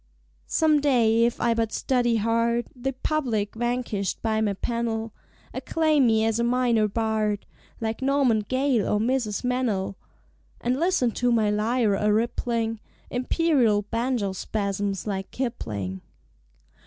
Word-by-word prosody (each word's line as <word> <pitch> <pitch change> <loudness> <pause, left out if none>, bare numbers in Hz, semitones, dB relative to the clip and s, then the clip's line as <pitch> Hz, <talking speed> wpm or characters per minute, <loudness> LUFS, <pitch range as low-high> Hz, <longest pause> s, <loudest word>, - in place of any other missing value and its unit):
Some 310 -2 +3
day, 230 -5 +3
if 240 - -1
I 235 -1 +2
but 225 -1 -1
study 245 -3 +1
hard, 230 +2 +1
The 265 +2 -3
public, 250 -7 -1
vanquished 240 -4 -2
by 220 -1 +1
my 210 -2 +1
pen'll 230 0 -2 0.4
Acclaim 310 -5 +2
me 220 -1 +3
as 225 0 0
a - - +2
Minor 240 -3 +2
Bard, 215 -1 -1 0.3
Like 225 +1 -3
Norman 270 -4 +3
Gale 255 0 0
or 210 - +2
Mrs. 235 -2 -1
Meynell, 245 -7 0 0.7
And 250 +3 -1
listen 330 -8 +2
to 245 +2 0
my 220 -3 +2
lyre 220 +1 +1
a 210 +2 +1
rippling 225 0 -1 0.3
Imperial 250 -5 +2
banjo 230 -1 -1
spasms 200 -1 -2
like 195 -2 -3
Kipling. 105 - -4
230 Hz, 130 wpm, -25 LUFS, 210-250 Hz, 0.7 s, Some